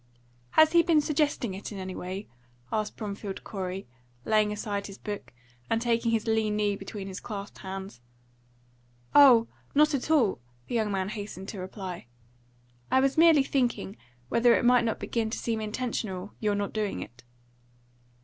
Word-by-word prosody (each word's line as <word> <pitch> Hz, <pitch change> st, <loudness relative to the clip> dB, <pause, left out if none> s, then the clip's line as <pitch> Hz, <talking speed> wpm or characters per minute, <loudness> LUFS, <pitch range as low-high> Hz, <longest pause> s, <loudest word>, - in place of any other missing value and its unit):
"Has 315 Hz, 0 st, +8 dB
he 340 Hz, -, +6 dB
been 335 Hz, -2 st, +4 dB
suggesting 295 Hz, -7 st, 0 dB
it 195 Hz, +3 st, -7 dB
in 205 Hz, -, -6 dB
any 185 Hz, -1 st, -5 dB
way?" 190 Hz, +3 st, -5 dB, 0.5 s
asked 215 Hz, -1 st, -1 dB
Bromfield 200 Hz, -2 st, -5 dB
Corey, 190 Hz, -2 st, -5 dB, 0.4 s
laying 215 Hz, -1 st, +3 dB
aside 205 Hz, -1 st, -3 dB
his 195 Hz, -1 st, -10 dB
book 205 Hz, -1 st, -6 dB, 0.4 s
and 225 Hz, -, +2 dB
taking 230 Hz, 0 st, +1 dB
his 225 Hz, -2 st, +1 dB
lean 220 Hz, -2 st, +1 dB
knee 205 Hz, -1 st, +1 dB
between 195 Hz, 0 st, -7 dB
his 190 Hz, -1 st, -6 dB
clasped 205 Hz, -3 st, -7 dB
hands. 190 Hz, -7 st, -7 dB, 1.1 s
"Oh, 250 Hz, -5 st, +8 dB, 0.3 s
not 300 Hz, +1 st, +5 dB
at 275 Hz, +1 st, -2 dB
all!" 265 Hz, -, +3 dB, 0.3 s
the -, -, -6 dB
young 220 Hz, -3 st, +1 dB
man 190 Hz, -1 st, -1 dB
hastened 205 Hz, -2 st, -6 dB
to 205 Hz, -, -6 dB
reply. 185 Hz, -, -6 dB, 0.8 s
"I 260 Hz, -, +4 dB
was 270 Hz, 0 st, +2 dB
merely 320 Hz, -3 st, +6 dB
thinking 245 Hz, -7 st, -1 dB, 0.3 s
whether 235 Hz, 0 st, +4 dB
it -, -, +1 dB
might 245 Hz, -1 st, +5 dB
not 225 Hz, -, -1 dB
begin 225 Hz, -2 st, -1 dB
to -, -, -3 dB
seem 225 Hz, -2 st, -2 dB
intentional, 210 Hz, -4 st, -3 dB
your 210 Hz, -2 st, +1 dB
not 200 Hz, 0 st, -2 dB
doing 215 Hz, -2 st, -2 dB
it." 120 Hz, +1 st, -15 dB
215 Hz, 165 wpm, -28 LUFS, 195-240 Hz, 1.1 s, Has